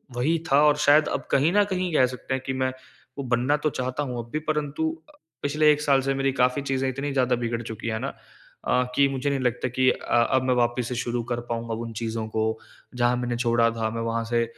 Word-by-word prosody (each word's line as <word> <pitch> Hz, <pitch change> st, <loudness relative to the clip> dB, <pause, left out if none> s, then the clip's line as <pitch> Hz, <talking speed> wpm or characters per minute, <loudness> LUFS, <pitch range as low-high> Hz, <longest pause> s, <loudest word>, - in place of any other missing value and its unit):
वही 150 Hz, +7 st, +1 dB
था 140 Hz, +2 st, +6 dB
और 150 Hz, -1 st, +5 dB
शायद 150 Hz, +1 st, +5 dB
अब -, -, -2 dB
कहीं 145 Hz, +5 st, +3 dB
न 205 Hz, 0 st, +5 dB
कहीं 180 Hz, -2 st, -1 dB
कह 130 Hz, -, +5 dB
सकते 125 Hz, +1 st, -5 dB
हैं 130 Hz, 0 st, -2 dB
कि 135 Hz, -, -2 dB
मैं 130 Hz, 0 st, 0 dB, 0.5 s
वो 140 Hz, -, -3 dB
बनना 125 Hz, +3 st, +1 dB
तो -, -, +4 dB
चाहता 130 Hz, +1 st, -3 dB
हूँ 125 Hz, -3 st, -4 dB
अब 115 Hz, -, -17 dB
भी 155 Hz, -, 0 dB
परंतु 150 Hz, -, 0 dB, 0.2 s
अ, -, -, -19 dB, 0.3 s
पिछले 150 Hz, +2 st, +3 dB
1 150 Hz, 0 st, +1 dB
साल 140 Hz, -2 st, +3 dB
से 135 Hz, +1 st, 0 dB
मेरी 135 Hz, 0 st, +1 dB
काफ़ी 125 Hz, +3 st, +2 dB
चीज़ें 135 Hz, -1 st, -1 dB
इतनी 140 Hz, +2 st, -3 dB
ज़्यादा 130 Hz, -2 st, +2 dB
बिगड़ 115 Hz, 0 st, -2 dB
चुकी 110 Hz, 0 st, -6 dB
है 110 Hz, -1 st, -1 dB
ना -, -, -3 dB, 0.6 s
अ, 125 Hz, -, +3 dB
कि 140 Hz, -, +5 dB
मुझे 135 Hz, +1 st, -1 dB
नहीं 140 Hz, -1 st, 0 dB
लगता 125 Hz, 0 st, 0 dB
कि 130 Hz, +1 st, +2 dB
अ, 120 Hz, 0 st, +1 dB
अब 130 Hz, -1 st, +3 dB
मैं 130 Hz, 0 st, +2 dB
वापस 120 Hz, 0 st, +1 dB
से 125 Hz, -, -3 dB
शुरू 120 Hz, 0 st, -2 dB
कर 120 Hz, -, 0 dB
पाऊँगा 115 Hz, -1 st, -3 dB
उन 115 Hz, -1 st, -5 dB
चीज़ों 115 Hz, 0 st, -3 dB
को। 110 Hz, 0 st, -1 dB, 0.4 s
जहाँ 120 Hz, 0 st, +2 dB
मैंने 120 Hz, -1 st, -2 dB
छोड़ा 115 Hz, -1 st, +3 dB
था, 115 Hz, -1 st, -2 dB
मैं 115 Hz, +1 st, -4 dB
वहाँ 115 Hz, 0 st, -1 dB
से 115 Hz, 0 st, +1 dB
130 Hz, 245 wpm, -25 LUFS, 120-140 Hz, 0.6 s, था